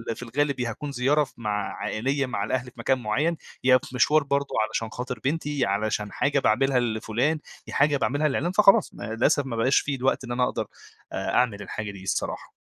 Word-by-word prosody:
في -, -, -8 dB
الغالب 140 Hz, +2 st, -1 dB
يا 120 Hz, -1 st, -1 dB
هاكون 140 Hz, +6 st, -5 dB
زيارة 140 Hz, +4 st, +2 dB
ف -, -, -10 dB
مع 105 Hz, -3 st, -2 dB
عائلية 135 Hz, +7 st, 0 dB
مع 115 Hz, -5 st, -3 dB
الأهل 130 Hz, +4 st, -1 dB
في 120 Hz, -, -19 dB
مكان 130 Hz, +2 st, +1 dB
معين، 145 Hz, +10 st, 0 dB, 0.3 s
يا 130 Hz, 0 st, +6 dB
في 125 Hz, -, -9 dB
مشوار 150 Hz, +4 st, +4 dB
برضه 140 Hz, 0 st, 0 dB, 0.2 s
علشان 115 Hz, -1 st, -3 dB
خاطر 125 Hz, +1 st, -5 dB
بنتي، 145 Hz, -2 st, 0 dB
علشان 105 Hz, +1 st, -1 dB
حاجة 140 Hz, 0 st, +1 dB
باعملها 130 Hz, +3 st, +3 dB
لفُلان، 120 Hz, +6 st, 0 dB, 0.3 s
يا -, -, -8 dB
حاجة 145 Hz, -1 st, +3 dB
باعملها 145 Hz, +3 st, +1 dB
لعِلّان 165 Hz, +5 st, 0 dB
فخلاص 195 Hz, 0 st, +5 dB
ما -, -, -9 dB
للأسف 135 Hz, +4 st, +2 dB
ما 120 Hz, -3 st, -4 dB
بقاش 120 Hz, +4 st, +3 dB
في 140 Hz, -1 st, -2 dB
الوقت 130 Hz, +1 st, 0 dB
إن 120 Hz, -, -6 dB
أنا 125 Hz, +1 st, +1 dB
اقدر -, -, -1 dB, 0.5 s
آآ -, -, -2 dB
أعمل 110 Hz, -5 st, +2 dB
الحاجة 105 Hz, +1 st, -5 dB
دي 95 Hz, -1 st, -11 dB
الصراحة. 95 Hz, -, -3 dB
130 Hz, 205 wpm, -25 LUFS, 115-140 Hz, 0.5 s, يا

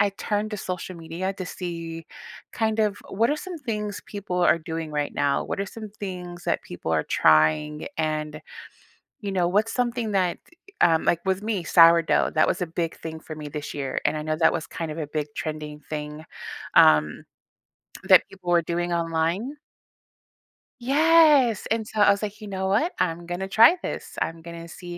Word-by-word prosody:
I 205 Hz, -, +3 dB
turn 210 Hz, 0 st, -1 dB
to 215 Hz, -, -5 dB
social 185 Hz, -2 st, -5 dB
media 170 Hz, +3 st, -4 dB
to 185 Hz, -1 st, -6 dB
see 165 Hz, -3 st, -6 dB, 0.5 s
kind 220 Hz, -1 st, 0 dB
of 210 Hz, -2 st, +1 dB
what 225 Hz, +6 st, +1 dB
are 295 Hz, -, +1 dB
some 355 Hz, +2 st, -7 dB
things 210 Hz, -7 st, -4 dB
people 200 Hz, -3 st, -4 dB
are 170 Hz, -, +4 dB
doing 160 Hz, -1 st, -5 dB
right 150 Hz, -1 st, -2 dB
now, 140 Hz, -1 st, +1 dB
what -, -, -4 dB
are 200 Hz, -, -2 dB
some 215 Hz, +1 st, -9 dB
things 180 Hz, -3 st, -6 dB
that 170 Hz, -, 0 dB
people 90 Hz, -2 st, -6 dB
are 80 Hz, -1 st, +1 dB
trying, 80 Hz, -, +3 dB
and, 155 Hz, -1 st, -2 dB, 0.8 s
you 200 Hz, -3 st, -4 dB
know, 180 Hz, -2 st, +1 dB
what's 210 Hz, +5 st, +1 dB
something 240 Hz, -3 st, -1 dB
that, 185 Hz, -3 st, +1 dB
e -, -, -44 dB, 0.3 s
eh, -, -, +7 dB
um, 160 Hz, -, 0 dB
like, 170 Hz, -, +2 dB
with 190 Hz, +1 st, 0 dB
me, 215 Hz, -4 st, -1 dB
sourdough, 165 Hz, -1 st, +5 dB
that 155 Hz, -, +3 dB
was -, -, -1 dB
a -, -, 0 dB
big 165 Hz, 0 st, -3 dB
thing 160 Hz, -1 st, -7 dB
for 155 Hz, -, -8 dB
me 150 Hz, -1 st, -7 dB
this 150 Hz, 0 st, -6 dB
year. 135 Hz, -2 st, -3 dB
And -, -, 0 dB
I 150 Hz, -, -3 dB
know 155 Hz, 0 st, -1 dB
that 160 Hz, 0 st, +4 dB
was 165 Hz, -2 st, -3 dB
kind 165 Hz, -1 st, -5 dB
of 155 Hz, -, -6 dB
a 155 Hz, -, -3 dB
big 150 Hz, -1 st, -2 dB
trending 150 Hz, -1 st, -5 dB
thing, 150 Hz, 0 st, -5 dB, 0.5 s
um, 75 Hz, 0 st, +5 dB, 0.8 s
that -, -, +8 dB
people 185 Hz, -2 st, -5 dB
were 175 Hz, -1 st, +5 dB
doing 175 Hz, +1 st, -2 dB
online. 170 Hz, -, -1 dB, 1.3 s
Yes! 290 Hz, -3 st, +5 dB
And 225 Hz, -1 st, 0 dB
so 220 Hz, -, -5 dB
I 205 Hz, -, +7 dB
was 200 Hz, -, 0 dB
like, 210 Hz, -1 st, -5 dB
"You 215 Hz, -, -9 dB
know 190 Hz, -1 st, -3 dB
what? 220 Hz, -, +2 dB
I'm 175 Hz, -1 st, -1 dB
gonna 175 Hz, +2 st, -4 dB
try 230 Hz, -, +6 dB
this. -, -, -5 dB
I'm 165 Hz, 0 st, -3 dB
gonna 170 Hz, 0 st, -8 dB
see 175 Hz, +1 st, -9 dB
175 Hz, 195 wpm, -25 LUFS, 160-210 Hz, 1.3 s, that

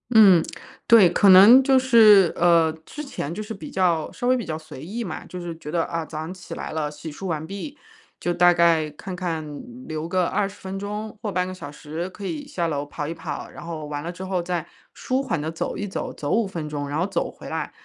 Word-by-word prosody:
嗯。 190 Hz, -6 st, +8 dB, 0.4 s
对， 225 Hz, -6 st, +8 dB
可 185 Hz, +3 st, +4 dB
能 205 Hz, +8 st, +9 dB
就 265 Hz, 0 st, +4 dB
是， 220 Hz, -8 st, +6 dB
呃， 170 Hz, -2 st, +4 dB
之 300 Hz, -, -8 dB
前 165 Hz, -, -5 dB
就 215 Hz, +5 st, -5 dB
是 220 Hz, -, -6 dB
比 195 Hz, -, -9 dB
较 175 Hz, -4 st, +1 dB
稍 -, -, -6 dB
微 255 Hz, +1 st, +4 dB
比 245 Hz, -, -2 dB
较 155 Hz, -2 st, -4 dB
随 155 Hz, -3 st, -11 dB
意 225 Hz, +7 st, -4 dB
嘛， 185 Hz, -, -6 dB
就 180 Hz, -, -7 dB
是 170 Hz, -1 st, -6 dB
觉 150 Hz, -, -8 dB
得， 165 Hz, +1 st, 0 dB
啊， 165 Hz, -1 st, -3 dB
早 155 Hz, -, -8 dB
上 160 Hz, +4 st, -5 dB
起 185 Hz, -1 st, -9 dB
来 -, -, -6 dB
了， 155 Hz, -2 st, -2 dB
洗 150 Hz, +1 st, -8 dB
漱 190 Hz, +6 st, -7 dB
完 160 Hz, -2 st, -2 dB
毕， 200 Hz, -, -7 dB, 0.4 s
就 175 Hz, -, -1 dB
大 175 Hz, +1 st, +5 dB
概 170 Hz, -3 st, +3 dB
看 180 Hz, +5 st, -8 dB
看 165 Hz, -4 st, -3 dB, 0.4 s
留 155 Hz, +1 st, -4 dB
个 185 Hz, -1 st, +1 dB
20 200 Hz, +2 st, -1 dB
分 190 Hz, +1 st, -6 dB
钟 210 Hz, +2 st, -5 dB
或 210 Hz, -, -3 dB
半 180 Hz, 0 st, 0 dB
个 185 Hz, -, -5 dB
小 145 Hz, -6 st, -8 dB
时 160 Hz, +4 st, -6 dB
可 200 Hz, +1 st, -9 dB
以 290 Hz, +4 st, -4 dB
下 175 Hz, -12 st, -2 dB
楼 145 Hz, -3 st, -2 dB
跑 145 Hz, 0 st, -5 dB
一 165 Hz, -, -3 dB
跑。 160 Hz, -3 st, -6 dB
然 -, -, -10 dB
后 165 Hz, -2 st, -6 dB
完 145 Hz, 0 st, -5 dB
了 170 Hz, -, -4 dB
之 180 Hz, -, -9 dB
后 185 Hz, -1 st, -1 dB
再 170 Hz, -2 st, -3 dB, 0.3 s
舒 260 Hz, +1 st, -1 dB
缓 175 Hz, -, -2 dB
地 155 Hz, +2 st, -3 dB
走 165 Hz, -, -4 dB
一 205 Hz, -, -3 dB
走， 190 Hz, -, -4 dB
走 145 Hz, -, -5 dB
5 225 Hz, -1 st, +2 dB
分 165 Hz, -5 st, -5 dB
钟， 145 Hz, -1 st, -4 dB
然 145 Hz, -, -2 dB
后 175 Hz, -, +1 dB
走 -, -, -2 dB
回 -, -, -12 dB
来， -, -, -3 dB
175 Hz, 255 characters per minute, -23 LUFS, 160-200 Hz, 0.4 s, 能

